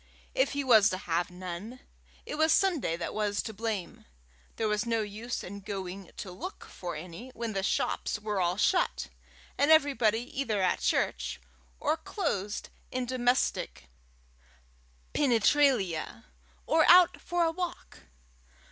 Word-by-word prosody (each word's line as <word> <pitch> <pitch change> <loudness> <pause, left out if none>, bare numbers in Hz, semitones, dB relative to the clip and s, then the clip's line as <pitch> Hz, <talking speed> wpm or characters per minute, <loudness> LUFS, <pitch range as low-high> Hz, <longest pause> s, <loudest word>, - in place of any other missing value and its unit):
If - - +2
he 285 0 -1
was 220 -5 +6
to 185 - -2
have 175 -1 -1
none, 185 +7 -7 0.5
it - - -6
was 315 +1 +3
Sunday 325 - +2
that - - -4
was 205 -1 0
to 220 - -6
blame: 215 -3 -4 0.5
there 220 - 0
was 210 0 +1
no 230 -1 +1
use 215 +4 -5
in 200 +2 -7
going 195 -2 -6
to 210 -6 -6
look 370 - -8
for 175 -2 -6
any 175 +10 -8
when 230 -2 -3
the 195 - -1
shops 195 - 0
were 210 -2 -2
all 175 +1 +1
shut, 360 - +1 0.5
and 285 - +4
everybody 270 -8 +4 0.2
either 220 -7 -1
at 185 -1 +2
church, - - 0 0.4
or 320 - +1
closed 210 - -3 0.2
in 255 0 -2
domestic 245 - 0 1.2
penetralia, 240 - +2 0.4
or 320 0 +4
out 355 0 +7
for 350 0 0
a 325 - +1
walk. 350 +1 -5
220 Hz, 140 wpm, -29 LUFS, 190-280 Hz, 1.2 s, out